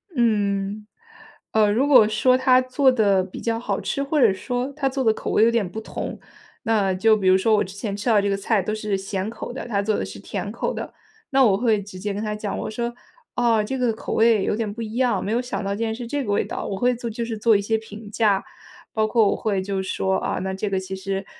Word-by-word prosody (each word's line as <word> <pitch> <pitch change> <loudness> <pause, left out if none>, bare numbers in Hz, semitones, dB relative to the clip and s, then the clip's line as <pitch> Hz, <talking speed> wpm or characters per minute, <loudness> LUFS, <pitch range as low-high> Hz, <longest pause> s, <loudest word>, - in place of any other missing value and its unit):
嗯。 210 -3 0 0.7
呃， 215 -1 +4
如 250 +6 +2
果 245 -7 +7
说 255 +4 +3
他 255 -1 +4
做 260 +2 +2
得 205 -6 +3
比 185 - -9
较 230 0 -1
好 - - -2
吃， 280 - -2
或 290 0 0
者 215 -5 +5
说 245 +7 -3
他 270 -1 -1
做 265 0 -2
的 220 -2 +4
口 - - -5
味 - - +4
有 230 - +5
点 220 -6 0
不 220 - -6
同， - - -6 0.5
那 205 -4 +2
就 215 +4 +4
比 195 -3 -1
如 185 0 +6
说 220 +3 +2
我 - - +2
之 190 +1 -9
前 200 -1 -4
吃 205 - -7
到 210 -3 +5
这 200 - 0
个 195 - 0
菜 200 0 +1
都 215 +4 -3
是 210 -2 -2
咸 195 +1 -3
口 235 - -7
的， 255 - -6
他 205 -4 0
做 210 +1 0
的 - - -2
是 - - -9
甜 - - -5
口 - - -2
的， - - -6 0.4
那 270 0 +5
我 195 -3 +4
会 220 -3 +2
直 185 -2 -10
接 205 +1 -3
跟 205 +2 -4
他 210 0 -2
讲， 210 -1 -4
我 - - -4
说： 235 +2 -3 0.4
“哦， 235 -3 +3
这 265 +6 -3
个 250 -2 +1
口 220 - -5
味 225 -3 +4
有 - - 0
点 215 -2 -2
不 235 - -7
一 220 0 -5
样， 245 -7 +1
没 210 - -2
有 240 - +1
想 230 -5 -4
到 200 0 -2
竟 230 +2 -2
然 220 - -2
是 235 +1 -6
这 285 +2 -2
个 205 - -3
味 200 - +1
道。” - - -5
我 195 - -3
会 245 +3 +2
做 235 0 -5
就 230 +2 -4
是 225 -1 -4
做 220 -1 +4
一 - - -2
些 220 +2 0
评 215 -1 -10
价。 205 -3 +2 0.5
包 215 0 +1
括 225 -1 +3
我 - - +1
会 200 -3 -1
就 190 0 -2
说： 190 0 0
“啊， - - -2
那 190 +1 -3
这 200 +2 -3
个 190 - 0
其 190 0 -6
实 195 0 -4
215 Hz, 285 characters per minute, -23 LUFS, 200-235 Hz, 0.7 s, 果